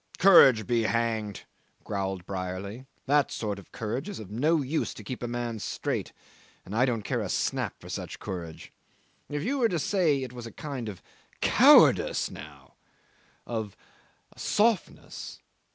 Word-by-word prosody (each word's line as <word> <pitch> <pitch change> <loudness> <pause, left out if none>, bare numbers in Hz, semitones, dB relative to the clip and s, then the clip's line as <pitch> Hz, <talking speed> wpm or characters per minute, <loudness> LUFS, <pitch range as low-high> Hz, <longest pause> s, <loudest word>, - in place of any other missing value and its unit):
"Courage 135 - +7
be 120 +1 +1
hanged!" 110 -3 -1 0.4
growled 95 -3 -3
Brierly. 95 +6 -5 0.2
"That 145 0 +3
sort 105 -3 -3
of 95 - -16
courage 115 - -4
is 205 - -6
of 105 -3 -9
no 150 +7 +2
use 150 +5 -2
to - - -10
keep 130 - -6
a 120 - -2
man 120 -1 -3
straight, - - -3 0.5
and 100 - -6
I 125 +3 +4
don't 115 -4 -1
care - - -1
a - - -4
snap - - -1
for - - -13
such - - -5
courage. 85 -4 -7 0.6
If 145 0 -3
you 275 +6 -1
were 235 -3 +3
to 175 - -1
say 160 -5 +1
it 125 -1 -7
was 120 -2 -7
a - - -9
kind 135 -7 -5
of 95 - -10 0.4
cowardice - - +5
now - - -12 0.7
of 110 -4 -4 0.6
softness. 215 -2 -1
115 Hz, 155 wpm, -28 LUFS, 105-145 Hz, 0.7 s, Courage